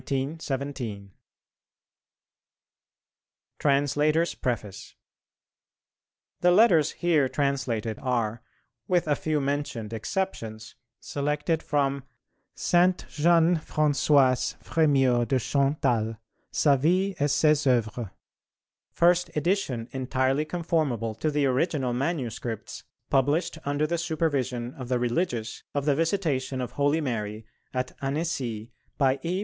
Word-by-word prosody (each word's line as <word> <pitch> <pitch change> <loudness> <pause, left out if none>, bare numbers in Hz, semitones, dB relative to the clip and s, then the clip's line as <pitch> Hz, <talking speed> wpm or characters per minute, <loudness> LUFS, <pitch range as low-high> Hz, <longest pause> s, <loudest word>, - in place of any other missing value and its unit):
_ 135 -7 -4 2.5
TRANSLATORS' 145 +3 +2
PREFACE 105 -6 -4 1.4
The 180 - +4
letters 175 -6 +5
here 160 -6 +2
translated 130 -6 -1
are, 120 -3 -1 0.5
with 175 -3 +1
a 145 - +3
few 155 0 -1
mentioned 140 -6 -3
exceptions, 110 - -4 0.3
selected 150 +3 -1
from 140 -2 0 0.5
"Sainte 180 +1 +2
Jeanne 170 +2 +3
Françoise 145 -4 +2
Frémyot 135 -7 +2
de 135 - +2
Chantal: 125 -4 0 0.3
Sa 145 -2 +3
Vie 185 +8 +2
et 145 +1 +2
ses 150 +1 +3
Oeuvres," 120 -3 +1 0.8
"First 175 0 +3
edition 150 - 0
entirely 130 +2 0
conformable 155 -9 -1
to 115 +9 -1
the 145 -1 +1
original 135 -1 0
manuscripts 120 - -3 0.3
published 145 +5 +1
under 145 +1 0
the 170 +2 -1
supervision 135 -7 -1
of 130 -2 -8
the 125 - +2
religious 120 -2 -2
of 140 -1 -1
the 145 - +3
Visitation 155 -5 -1
of 125 -1 -3
Holy 145 +4 +1
Mary 110 -5 -3 0.3
at 130 0 -2
Annecy, 135 -7 -3 0.3
by 135 -1 +2
E. 175 +5 -1
140 Hz, 105 wpm, -26 LUFS, 125-155 Hz, 2.5 s, letters